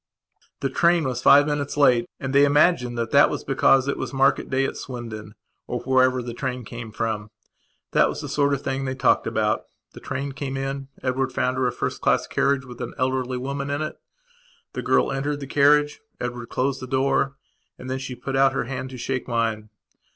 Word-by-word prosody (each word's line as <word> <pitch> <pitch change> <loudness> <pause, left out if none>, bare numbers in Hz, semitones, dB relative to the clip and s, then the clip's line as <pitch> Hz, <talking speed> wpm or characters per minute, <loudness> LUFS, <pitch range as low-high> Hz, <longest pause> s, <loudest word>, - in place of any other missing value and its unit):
The 135 - 0
train 170 -1 +3
was 125 -3 -2
five 145 +1 +7
minutes 145 -1 -2
late 125 -5 +4
and 135 0 -4
they 140 +1 +6
imagined 145 -4 +3
that 115 -1 -2
that 145 +1 +6
was - - -4
because 135 0 +3
it 140 - -1
was - - -4
market 135 0 +2
day 135 0 +1
at - - -3
Swindon 110 -4 -7 0.3
or 125 - -3
wherever 130 -1 +2
the 120 0 -6
train 125 -1 -4
came 115 0 -8
from. 105 -1 -3 0.6
That - - +4
was - - -5
the - - -5
sort 140 -1 +1
of 140 - -8
thing 135 0 -2
they 130 0 -3
talked 130 -1 +2
about. 105 -1 0 0.3
The - - -10
train 140 +1 -4
came 135 0 -4
in; 135 0 -4 0.2
Edward 130 0 0
found 130 +1 -1
her 130 -1 +2
a - - 0
first 120 - -4
class - - +2
carriage 140 -1 0
with 125 -2 -10
an - - -5
elderly 130 0 -1
woman 140 +2 -4
in 145 +2 -1
it. 155 - -6 0.7
The - - -3
girl - - +2
entered 145 +2 -2
the 140 - -6
carriage, 145 +2 +3 0.2
Edward 120 -1 -5
closed 135 +1 -1
the 130 - -6
door 135 +1 +1 0.4
and 125 - -10
then 130 +1 -2
she 130 -1 -6
put 135 +2 -5
out 135 0 +4
her - - -1
hand 130 +1 -5
to 130 - -9
shake 130 +1 -3
mine. 115 -2 -1
130 Hz, 210 wpm, -24 LUFS, 125-140 Hz, 0.7 s, five